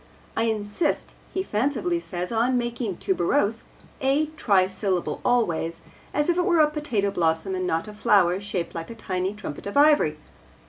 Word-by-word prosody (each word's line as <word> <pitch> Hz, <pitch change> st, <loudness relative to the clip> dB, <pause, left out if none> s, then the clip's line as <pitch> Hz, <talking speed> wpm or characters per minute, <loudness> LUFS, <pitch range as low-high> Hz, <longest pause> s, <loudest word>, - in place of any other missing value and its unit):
I 225 Hz, -, +1 dB
insist, 220 Hz, +7 st, -1 dB, 0.2 s
he 375 Hz, -, -1 dB
fancifully 290 Hz, -, 0 dB
says, 180 Hz, -, -5 dB
'on 240 Hz, +3 st, +2 dB
making 240 Hz, -5 st, -2 dB
"tuberose" 200 Hz, +4 st, 0 dB, 0.4 s
a 285 Hz, +3 st, +2 dB
trisyllable 190 Hz, -, +1 dB
always, 170 Hz, -9 st, +1 dB, 0.3 s
as 295 Hz, 0 st, 0 dB
if 345 Hz, 0 st, +2 dB
it 355 Hz, -, +2 dB
were 345 Hz, -4 st, +3 dB
a 300 Hz, -1 st, +5 dB
potato 235 Hz, -10 st, -1 dB
blossom 165 Hz, +1 st, 0 dB
and 185 Hz, -1 st, -1 dB
not 165 Hz, +1 st, -1 dB
a 210 Hz, -, -8 dB
flower 195 Hz, -4 st, +3 dB
shaped 195 Hz, -4 st, -3 dB
like 165 Hz, -1 st, -6 dB
a 230 Hz, -, -7 dB
tiny 190 Hz, -2 st, -2 dB
trumpet 200 Hz, -5 st, -7 dB
of 200 Hz, -, -3 dB
ivory.' 290 Hz, -, +5 dB
210 Hz, 165 wpm, -25 LUFS, 185-270 Hz, 0.4 s, a